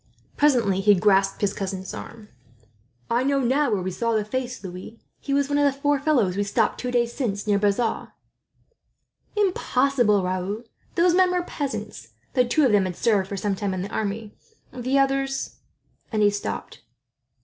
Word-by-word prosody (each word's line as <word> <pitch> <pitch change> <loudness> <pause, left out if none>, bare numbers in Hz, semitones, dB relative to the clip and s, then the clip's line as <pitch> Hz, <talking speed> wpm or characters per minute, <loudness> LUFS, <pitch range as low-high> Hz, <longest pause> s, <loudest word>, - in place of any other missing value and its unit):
Presently 240 -10 +3
he 205 +1 +5
grasped 195 0 +2
his 200 -1 +1
cousin's 190 -1 -5
arm. 220 -2 -9 0.8
"I 235 +1 +1
know 275 +1 +2 0.3
where 195 -4 0
we 185 - -2
saw 230 +4 -1
the 215 -1 0
face 250 0 -4
now, 185 - -6
Louis. 185 +5 -10 0.2
He 280 - -6
was 280 0 +2
one 290 0 +1
of - - +3
the 275 - -13
four 290 0 +2
fellows 260 -11 +2
we 200 - 0
stopped, 215 +2 0
two 250 - -3
days 240 -1 +1
since, 205 -7 -2
near 205 -2 +2
Bazas." 210 +3 0 1.3
"Impossible, 265 - +2
Raoul! 185 +4 -3 0.3
Those 345 0 +4
men 370 0 +4
were 360 -1 0
peasants, 215 - -5 0.2
though 250 -1 +3
two 290 +4 +3
of 250 - +3
them 205 -2 +4
had 180 -1 -4
served 200 -4 +1
for 200 - -4
a 195 0 -1
time 195 -1 -2
in 185 - -3
the 200 - -7
army; 210 0 -3 0.4
the 255 +2 0
others 270 0 0 0.3
" - - -41
and 215 -2 +1
he 205 - +5
stopped. 205 0 -5
220 Hz, 180 wpm, -24 LUFS, 200-270 Hz, 1.3 s, he